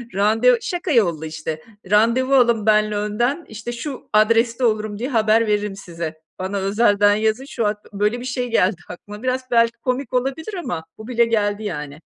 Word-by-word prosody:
Rande 225 +5 +4
şaka 355 -1 -3
yollu 170 - +2
işte, 155 0 -5 0.3
randevu 235 +6 +3
alın 235 -4 +3
benle 215 -1 +3
önden, 240 +10 -1
işte, 220 +2 -6
şu 255 +3 -7
adreste 230 +3 +3
olurum 215 -2 -1
diye 255 +4 -3
haber 225 -1 +3
veririm 210 -1 0
size. 170 -4 -6 0.2
Bana 190 +2 -3
özelden 205 +1 +3
yazın, 220 +5 0
şu 230 -5 -3
hat 210 0 0 0.2
böyle 210 +4 0
bir 250 - -7
şey 245 -1 -3
geldi 190 -4 +2
aklıma. 205 +5 -10
Biraz 255 0 -2
belki 230 -1 +3
komik 255 0 -3
olabilir 270 - -2
ama 175 - -4
bu 220 +1 -10
bile 235 -1 +2
geldi, 210 -2 0
yani. 150 -6 -5
220 Hz, 175 wpm, -21 LUFS, 205-245 Hz, 0.3 s, Rande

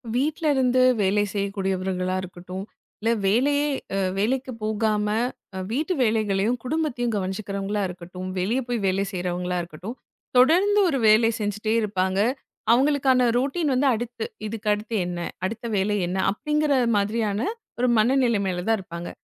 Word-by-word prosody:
வீட்ல 305 +4 0
இருந்து 255 -1 +3 0.2
வேலை 200 +1 +2
செய்யக்கூடியவர்களா 190 -2 -1
இருக்கட்டும், 185 +1 -7 0.4
இல்ல 225 - +1 0.2
வேலையே 285 +8 +3 0.5
வேலைக்கு 255 +6 0
போகாம, 215 -1 0 0.6
வீட்டு 305 +9 0
வேலைகளையும், 215 0 +1
குடும்பத்தையும் 250 -5 -1
கவனிச்சுக்கிறவங்களா 200 +1 -2
இருக்கட்டும், 180 +1 -8
வெளிய 215 +8 +1
போய் 240 -1 -1
வேலை 190 +1 +1
செய்யுறவங்களா 180 -1 -2
இருக்கட்டும், 175 +7 -8 0.4
தொடர்ந்து 365 +11 +5
ஒரு 280 - 0
வேலை 220 +2 +6
செஞ்சுகிட்டே 210 +1 -1
இருப்பாங்க. 190 -2 0 0.5
அவங்களுக்கான 260 -1 +4
ரொட்டின் 280 +4 0
வந்து, 265 +2 +2
அடுத்து 235 0 -4 0.2
இதுக்கு 215 0 -3
அடுத்து 215 +2 -4
என்ன? 175 0 -4 0.3
அடுத்த 225 +4 -4
வேலை 205 +2 +1
என்ன 180 +2 -2
அப்படிங்கிற 300 +6 0 0.2
மாதிரியான 205 0 0 0.4
ஒரு 250 - +2
மனநிலைமையில 215 -7 +2
தான் 225 - +4
இருப்பாங்க. 170 -2 -7
215 Hz, 125 wpm, -24 LUFS, 190-250 Hz, 0.6 s, வேலை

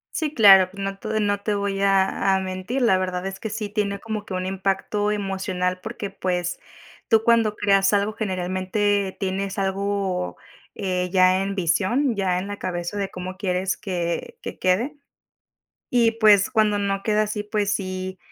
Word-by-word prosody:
Sí, 310 -2 -2
claro, 195 -5 +7
pues 195 +1 -8
no 195 0 -3
te 215 +1 -2
no 205 -1 +1
te 210 +1 -1
voy 200 -1 -2
a 195 0 +2
a - - +1
mentir, 190 +7 -3
la 195 -6 +4
verdad 185 -1 -2
es 190 0 -6
que 220 - -4
sí 210 -1 -4
tiene 200 -1 -1
como 215 0 -5
que 190 - -5
un 185 0 -2
impacto 195 +2 -1
emocional 190 -3 -2
porque, 215 -3 -5
pues, 180 -2 -2 0.5
tú 225 -2 +4
cuando 225 -2 +3
creas 195 -1 +3
algo 205 +1 +1
generalmente 190 0 -1
tienes 195 +1 -2
algo, 195 -1 -1 0.4
eh, 180 -2 -2
ya 185 0 +4
en 195 0 -2
visión, 200 - +1
ya 190 -3 0
en 185 - -4
la 205 0 -5
cabeza 175 +1 -4
de 200 -1 -1
cómo 185 +1 -7
quieres 185 -1 -1
que 185 - -3
que - - -7
quede. 230 +11 0 0.9
Y 235 -2 +3
pues 210 -2 +5
cuando 215 -2 +2
no 195 -1 -1
queda 215 -1 +2
así 210 0 -3
pues 210 -1 -1
si 185 -1 -4
195 Hz, 175 wpm, -23 LUFS, 185-210 Hz, 0.9 s, claro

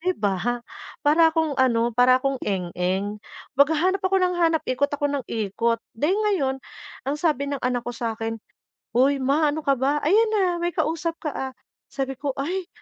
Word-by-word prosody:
'di 365 +2 0
ba? 220 +5 -1 0.4
Para 320 +3 +6
akong 320 -2 +1
ano, 235 -2 +2
para 250 +2 +5
akong 275 -1 -1
eng-eng, 190 +2 -2 0.4
maghahanap 320 +7 +3
ako 380 0 +1
nang 360 -1 +1
hanap, 330 -2 +2
ikot 255 +3 0
ako 290 0 -3
nang 280 -3 -2
ikot. 230 +2 0 0.2
Dahil 300 - +1
ngayon, 385 -12 +1 0.5
ang 275 +3 -1
sabi 300 -5 +1
ng 280 - -3
anak 245 -1 -1
ko 245 - -4
sa 230 -1 -3
'kin, 225 0 -4 0.6
"Uy, 275 +3 +4
Ma, 290 +3 +2
ano 310 - -3
ka 275 - +3
ba? 275 +3 +1
Ayan 430 +8 +4
na, 370 -5 +1
may 345 - +1
kausap 330 +1 -2
ka, 300 - -3
ah." 265 -1 -4 0.4
Sabi 270 -1 -3
ko, 275 +1 -2
"Ay, 355 +6 -2
275 Hz, 185 wpm, -24 LUFS, 240-325 Hz, 0.6 s, Para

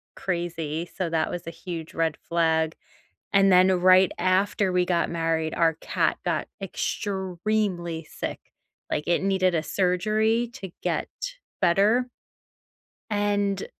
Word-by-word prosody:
crazy, 170 -2 -3
so 180 -3 -1
that 160 -1 0
was 175 -1 -6
a - - -3
huge 165 -1 -7
red 165 -2 0
flag. 160 -1 +2 0.6
And 195 -1 +5
then 185 +1 +6
right 185 0 +6
after 185 +1 +2
we 180 0 +3
got 175 -2 +1
married, 165 -1 -1
our 165 -1 +3
cat - - 0
got - - -1
extremely 190 -3 -2
sick. - - -5 0.5
Like, 150 - -1
it 175 +1 +2
needed 190 -2 +2
a 160 - +1
surgery 215 +7 +1
to 190 -8 -7
get - - -1 0.5
better. 205 +8 +3 1.0
And 205 -1 0
180 Hz, 125 wpm, -25 LUFS, 165-195 Hz, 1.0 s, then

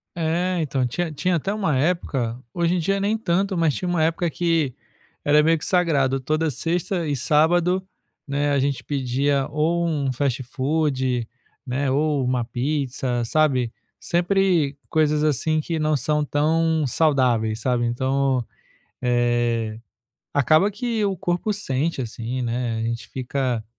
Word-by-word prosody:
É, 175 +2 0
então, 135 -4 0
tinha 165 +7 -2
tinha 180 +4 0
até 190 - -2
uma 200 -9 0
época, 130 -6 0
hoje 170 0 +1
em 180 - +1
dia 195 +4 0
nem 210 +3 +1
tanto, 195 -1 0
mas 165 -4 +2
tinha 180 - -3
uma 170 -3 +1
época 165 +1 +1
que 165 -6 0 0.5
era 150 +1 +5
meio 165 +2 +3
que 150 - -6
sagrado, 145 -7 +2
toda 155 +4 0
sexta 170 - -1
e 145 - 0
sábado, 170 +7 +2 0.4
né, 145 +1 0
a 140 - +2
gente 135 -3 -1
pedia 135 +1 0
ou 170 +3 +1
um 140 -5 -1
fast-food, 130 -1 -1 0.4
né, 135 +2 -1
ou 145 0 +1
uma 125 -1 0
pizza, 130 -2 -2
sabe, 130 -4 +1 0.3
sempre 175 -5 +1
coisas 155 -1 +2
assim 155 +2 +1
que 160 +1 -2
não 155 -1 +2
são 150 +3 0
tão 160 +1 +1
saudáveis, 125 -7 +2
sabe, 120 -1 +1
então, 130 +1 0 0.6
eh, 120 -2 +1 0.5
acaba 155 - +4
que 225 -1 -1
o 195 - 0
corpo 180 +5 -1
sente 155 -6 -1
assim, 120 +1 -4
né, 120 -1 -2
a 110 - -2
gente 115 +1 -3
fica, 130 -3 -2
145 Hz, 145 wpm, -23 LUFS, 130-165 Hz, 0.6 s, era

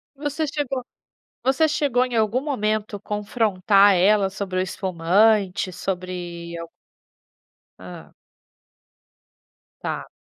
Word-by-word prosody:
Você 290 +2 -2
chegou 280 -4 -3 0.6
você 270 +5 +3
chegou 270 -5 +1
em 250 -2 -5
algum 220 +3 +1
momento 215 -7 -2
confrontar 205 -2 +3
ela 195 +2 +4
sobre 190 -1 -3
o - - +2
espumante, 190 +2 +1
sobre 175 -2 -5
al 170 - -7 1.1
Hã. - - -11 1.7
Tá. - - -4
205 Hz, 95 wpm, -23 LUFS, 185-250 Hz, 1.7 s, ela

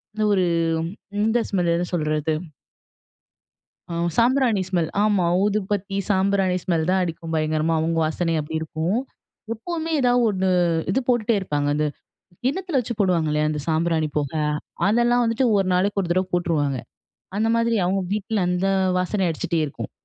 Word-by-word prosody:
இந்த 215 - 0
ஒரு 185 -2 +2 0.8
இந்த 225 +2 +2
ஸ்மெல் 175 -3 +1
என்ன 175 0 -2
சொல்றது 155 -1 0 1.6
ஆ - - -2 0.2
சாம்பிராணி 240 -4 +3
ஸ்மெல். 170 -4 0
ஆமா 205 -4 +2 0.2
ஊதுபத்தி, 200 -1 -1
சாம்பிராணி 190 -1 +2
ஸ்மெல் 165 -4 0
தான் 190 - +2
அடிக்கும் 165 -1 -4
பயங்கரமா 155 +1 +1
அவுங்க 165 +1 0
வாசனை 165 +2 -1
அப்பிடி 160 +2 -3
இருக்கும். 160 +7 -1 0.6
எப்பவுமே 325 +7 -4
ஏதாவது 245 -1 +3
1 190 -1 0 0.4
இது 265 - +1
போட்டுட்டே 235 -2 +2
இருப்பாங்க. 145 -5 -1
அந்த 150 +1 +1 0.6
கிண்ணத்தில 335 +3 0
வச்சு 235 0 -4
போடுவாங்க 175 -5 +2
இல்லயா 150 0 +1
அந்த 150 -1 -2
சாம்பிராணி 160 -1 +1
புகை. 150 +1 -1 0.5
அதெல்லாம் 240 +3 +3
வந்துட்டு 230 +3 +1
ஒரு 195 - +2
நாளைக்கு 200 +2 +1
ஒரு 175 - -5
தடவை 185 +1 +1
போட்டுருவாங்க. 150 -6 0 0.6
அந்த 220 - +1
மாதிரி 230 0 +2
அவுங்க 190 +1 +1
வீட்ல 215 +1 -1
அந்த 180 +2 0 0.3
வாசனை 185 +2 0
அடிச்சிட்டே 165 +1 -2
இருக்கும். 140 - -7
185 Hz, 145 wpm, -23 LUFS, 160-215 Hz, 1.6 s, சாம்பிராணி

